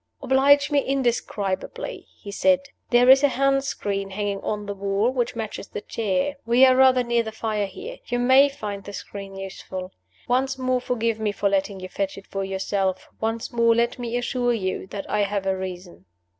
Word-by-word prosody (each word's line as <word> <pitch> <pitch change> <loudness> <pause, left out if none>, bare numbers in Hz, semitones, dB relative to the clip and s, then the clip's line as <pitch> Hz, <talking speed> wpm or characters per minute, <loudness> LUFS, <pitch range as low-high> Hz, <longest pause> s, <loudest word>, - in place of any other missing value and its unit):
"Oblige 285 +2 +4
me 290 - +4
indescribably," 240 -8 -2
he 200 - -9
said. 275 +6 +3 0.3
"There 245 0 +5
is 265 +1 +8
a 285 - +5
hand 275 0 +2
screen 200 -7 -3
hanging 200 0 -3
on 210 -1 -3
the 200 - -4
wall, 200 +4 0
which 245 -2 -1
matches 220 -3 -5
the - - -6
chair. 220 +7 -1
We 240 +3 +5
are 260 -1 +5
rather 260 -1 +5
near 235 -1 +1
the 220 -1 -5
fire 215 -2 -2
here. 465 - -8
You 245 - -1
may 260 +3 +6
find 205 -7 -6
the 200 - -9
screen 195 -1 -8
useful. 190 -1 -7 0.4
Once 265 +2 +1
more 255 -1 0
forgive 230 -3 -1
me 215 -1 0
for 200 0 0
letting 195 0 -1
you 185 - -5
fetch 195 +1 -3
it 195 - -10
for 195 0 -4
yourself. 190 0 -2
Once 225 +1 -2
more 230 -1 +4
let 235 +1 +1
me 240 0 -2
assure 245 0 0
you 190 -4 -3
that 195 +1 -6
I 210 - 0
have 200 -1 0
a 190 0 +1
reason." 180 - -7
220 Hz, 195 wpm, -24 LUFS, 195-255 Hz, 0.4 s, is